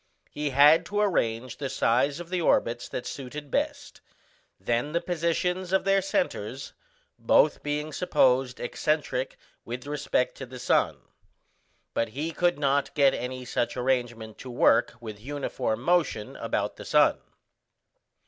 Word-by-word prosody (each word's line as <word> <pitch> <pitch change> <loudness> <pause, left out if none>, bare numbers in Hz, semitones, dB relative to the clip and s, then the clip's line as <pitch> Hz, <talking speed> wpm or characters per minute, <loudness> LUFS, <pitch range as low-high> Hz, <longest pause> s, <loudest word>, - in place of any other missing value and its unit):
He 150 0 -2
had 145 +4 +6
to 205 0 -2
arrange 125 - 0
the 140 -2 -3
size 135 +3 +1
of 175 -1 -8
the 180 -1 0
orbits 120 -6 +1
that 125 - -5
suited 140 +1 -7
best, - - -2 0.6
then 120 +6 -1
the 170 - +2
positions 175 +1 -1
of 190 - +2
their 195 0 +3
centres, 265 +9 -2 0.5
both - - +3
being 150 +1 -3
supposed 130 -6 +2
excentric - - -1 0.3
with 125 +3 -6
respect 145 -3 -1
to 135 - -7
the 130 +1 -9
sun; 125 - +1 0.9
but 115 - 0
he 160 +3 -2
could 175 0 +1
not 140 -1 0
get 140 -2 +5
any 125 0 -4
such 120 0 -2
arrangement 120 -4 -1
to 130 - -8
work 120 -1 +3
with 110 -3 -8
uniform 130 -4 -3
motion 165 -10 +1
about - - -2
the - - -9
sun. - - +4
140 Hz, 140 wpm, -27 LUFS, 125-170 Hz, 0.9 s, had